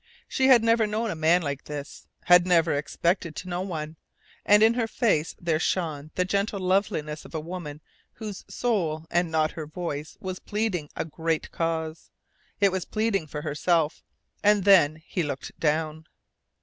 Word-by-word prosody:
She 265 - +1
had 250 -4 +7
never 230 -1 +3
known 215 +1 -1
a - - -4
man 165 +3 +3
like 140 -2 -4
this, 145 -1 -8 0.2
had 180 0 +6
never 170 -3 +4
expected 170 +3 -1
to 185 - -7
know 180 0 -2
one; 160 -4 -5 0.5
and 210 +1 +6
in 225 +1 +6
her 235 -2 0
face 205 -9 +1
there 165 -3 0
shone 155 -5 -1
the 180 - +1
gentle 200 +1 -1
loveliness 180 -5 0
of - - -11
a - - 0
woman 155 -2 -7 0.3
whose 210 -4 -7
soul 170 -10 -1
and 175 0 +2
not 155 -1 +1
her 155 -2 -7
voice 155 -2 -5
was 185 -1 -5
pleading 205 -8 -2
a - - -2
great 160 0 -2
cause. 160 -1 -3 0.5
It 200 -2 +4
was 185 -1 -2
pleading 215 -6 -1
for 150 0 -6
her - - -3
self. 160 0 +1 0.4
And 205 -1 +4
then 160 -6 +5
he 185 - -2
looked 145 -4 -5
down. 155 0 -1
170 Hz, 175 wpm, -26 LUFS, 155-200 Hz, 0.5 s, had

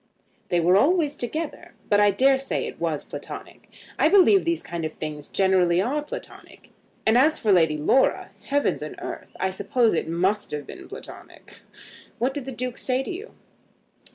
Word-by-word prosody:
"They 175 - +1
were 180 +3 +4
always 300 - +2
together, 305 +5 -5
but 205 - +3
I 205 0 +5
dare 265 +7 +3
say 270 - -2
it - - -8
was - - -1
Platonic. - - -9 0.3
I - - +5
believe 390 0 +5
these 335 0 0
kind 170 -1 -5
of 155 0 -3
things 150 -1 -6
generally 185 -3 +2
are 265 +10 0
Platonic. 295 - -10 0.3
And 220 +3 +5
as 305 +4 +4
for 215 - +1
Lady 160 -5 +4
Laura; 205 - +2
heavens 285 0 0
and - - -6
earth! - - -7
I 190 - 0
suppose 220 +4 +1
it 165 - -1
must 190 +5 0
have 150 -1 -5
been - - -10
Platonic. - - -12 0.6
What 255 +3 0
did 280 -3 -5
the 265 - -5
Duke 250 -1 -5
say 255 0 0
to - - -5
you?" 400 +6 -8
230 Hz, 180 wpm, -24 LUFS, 180-285 Hz, 0.6 s, I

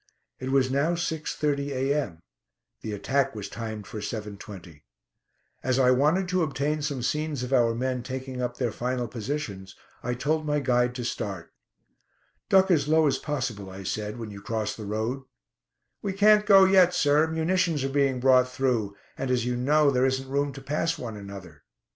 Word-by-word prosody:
It 130 - -4
was 130 -1 +3
now 145 +5 +2
6.30 150 -3 -2
a.m. 135 - -1 0.6
The 110 - -5
attack 130 +6 0
was 105 -2 -5
timed 110 -2 -6
for 110 - -7
7.20. 100 -7 -7 0.8
As 130 -1 0
I 130 -1 +5
wanted 150 +9 +2
to 185 0 +1
obtain 150 0 -1
some 140 -4 -3
scenes 150 -1 -1
of 125 +2 -3
our 115 -3 +3
men 130 +1 -1
taking 130 0 -5
up 125 0 -3
their 120 -3 -1
final 125 +1 -2
positions, 110 -5 -5 0.3
I 125 0 -2
told 155 +5 0
my 150 -1 0
guide 125 -2 +1
to 125 - -4
start. 100 -7 -4 1.0
"Duck 190 0 +5
as 145 -4 +3
low 160 +1 +4
as 135 -2 +1
possible," 125 -10 -3
I 95 +1 -9
said, 105 +3 -3
"when 115 -3 -6
you 100 -1 -9
cross 110 0 -2
the 110 - -8
road." 110 +6 -2 0.8
"We 195 - -2
can't 210 +1 +5
go 195 -2 +8
yet, 185 -2 +5
sir; 145 +2 +3
munitions 160 -1 0
are - - 0
being 135 -2 +1
brought 130 0 +4
through, 120 -7 0 0.2
and, 135 - -2
as 125 -2 +1
you 125 0 -1
know, 145 +4 +3
there 130 0 +3
isn't 130 0 -2
room 140 +1 0
to 135 - -9
pass 150 +4 -1
one 115 -3 -6
another." 100 -2 -10
130 Hz, 180 wpm, -26 LUFS, 115-150 Hz, 1.0 s, go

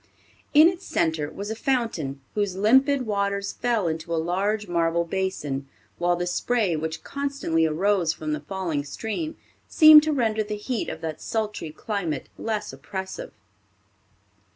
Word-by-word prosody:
In 305 +2 +9
its 360 +1 -2
center 160 -3 0
was 205 +5 -6
a - - -2
fountain, 225 - -1
whose 205 -3 -1
limpid 265 +6 +4
waters 200 -1 -1
fell 235 -6 0
into 160 +1 -4
a 165 - +1
large 195 +6 0
marble 170 -1 +1
basin, 165 -7 -3 0.3
while 175 0 +2
the 175 0 -2
spray 200 0 0
which 160 +1 -4
constantly 275 - 0
arose 180 +1 +2
from 155 -1 -4
the 150 - -2
falling 160 -2 -3
stream 220 - -4 0.3
seemed 310 -1 +9
to 310 +1 -1
render 225 -6 +1
the 210 0 -3
heat 225 +2 -3
of - - -7
that 160 -1 -5
sultry 210 -7 -3
climate 165 - -4
less 215 -2 -3
oppressive. 190 -1 -6
195 Hz, 150 wpm, -25 LUFS, 165-225 Hz, 0.3 s, In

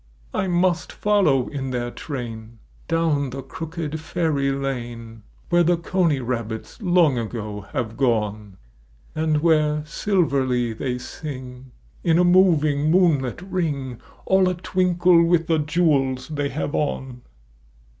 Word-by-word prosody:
1 190 - -1
must 175 0 +1
follow 190 -12 +2
in 135 -2 -4
their 120 -1 -2
train 115 -6 -7 0.3
Down 155 -4 +1
the 135 +1 -6
crooked 160 +2 -5
fairy 150 -3 0
lane 120 -4 -5 0.3
Where 175 0 +4
the 175 +1 +3
coney 170 -4 +1
rabbits 115 - -5
long 175 - +3
ago 105 -3 -5
have 115 -3 -3
gone, 105 -6 -1 0.6
And 155 -1 0
where 150 -2 +2
silverly 135 - 0
they 125 +2 -3
sing 130 -2 -8 0.3
In 165 -1 +3
a 180 - +5
moving 155 -5 +4
moonlit 160 -5 +2
ring 145 -10 -3 0.2
All 190 -1 +4
a 180 - -1
twinkle 180 -1 +3
with 170 -1 +2
the 160 -1 +1
jewels 145 -5 +1
they 145 -2 -2
have 145 +1 -3
on. 130 -4 -2
145 Hz, 125 wpm, -23 LUFS, 125-170 Hz, 0.6 s, a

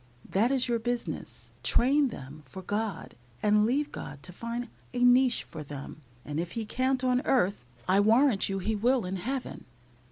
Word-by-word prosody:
That 215 +5 +2
is 265 -2 +1
your 235 -1 +1
business; 240 +1 -4
train 275 +4 +3
them 145 - -9
for 190 +8 -9
God, 205 -1 -3 0.3
and 210 0 +4
leave 285 +5 0
God 145 0 -8
to 180 - -10
find 235 +5 -4 0.3
a 245 - +1
niche 250 0 +5
for 155 - -9
them, 145 +1 -8 0.2
and 150 +1 -3
if 170 - -3
He 230 -2 -3
can't 260 +3 0
on 250 0 +2
earth, 205 - +1 0.2
I 190 +2 +4
warrant 225 +1 +4
you 195 - -1
He 215 +3 -1
will 240 +1 +2
in 190 +1 -3
Heaven." 255 +7 -4
225 Hz, 180 wpm, -29 LUFS, 190-250 Hz, 0.3 s, niche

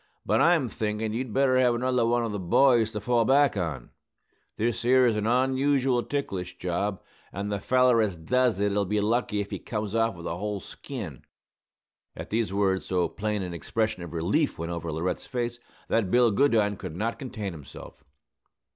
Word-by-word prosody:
But - - +2
I'm 165 -6 +4
thinkin' 110 -1 -2
you'd 125 +1 -3
better 130 +1 +3
have 125 -2 +3
another 125 -1 +1
one 120 0 +1
of 115 - -3
the 105 - -3
boys 115 +5 +4
to 105 - -2
fall 120 +2 +2
back 140 +2 +4
on. 80 -10 -4 0.7
This 115 +1 -1
'ere's 125 -2 +4
an 105 0 -1
onusual 130 +1 +2
ticklish 90 -11 -3
job; 90 +3 -2 0.3
and 100 +2 -4
the 100 - -1
feller 125 +1 +3
as 105 -4 0
does 120 +6 +1
it'll 100 0 +1
be 105 +3 0
lucky 105 0 0
if 100 - -7
he - - -4
comes 105 -2 -4
off 115 -2 +1
with 85 0 -10
a 85 - -3
whole 105 +1 -3
skin." 95 - -8 0.9
At - - -8
these 110 -2 0
words 95 -1 0
so 90 -2 +1
plain 105 -1 -2
an 90 -1 -5
expression 110 +4 -2
of 85 -2 -7
relief 95 - 0
went 85 +1 -4
over 85 -1 -4
Laurette's 85 +4 -3
face 120 -2 -3 0.3
that 110 -5 +1
Bill 120 +2 +4
Goodine 105 -4 +2
could 80 - -7
not 110 +5 -2
contain 110 -8 -5
himself. 75 -1 -12
110 Hz, 180 wpm, -27 LUFS, 95-125 Hz, 0.9 s, I'm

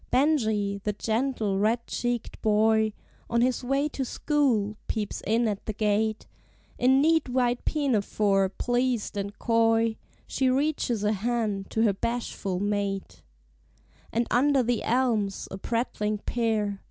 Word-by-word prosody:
Benjie, 220 -8 +1
the 210 - -1
gentle, 220 -2 -1
red 230 +3 +1
cheeked 240 -1 -3
boy. 220 0 +3 0.4
On 235 0 +2
his 250 +1 +1
way 275 +3 +1
to 275 - -3
school, 245 -7 0
peeps 210 -2 -3
in 230 +2 +2
at 205 -2 -3
the 215 - -2
gate; 215 +1 0 0.5
In 265 +2 +4
neat 320 -3 +3
white 245 -1 0
pinafore, 210 -8 +1
pleased 245 +1 -1
and 200 0 -4
coy, 225 -1 +2 0.3
She 260 -1 0
reaches 260 -5 0
a 210 - +2
hand 215 -2 -2
to 225 - +1
her 210 -3 +3
bashful 200 -4 -3
mate; 195 - -2 0.9
And 235 +1 +1
under 270 +1 +3
the 240 -1 0
elms, 225 -5 0
a 190 - -6
prattling 215 -2 -1
pair. 215 -3 -1
225 Hz, 135 wpm, -27 LUFS, 205-245 Hz, 0.9 s, In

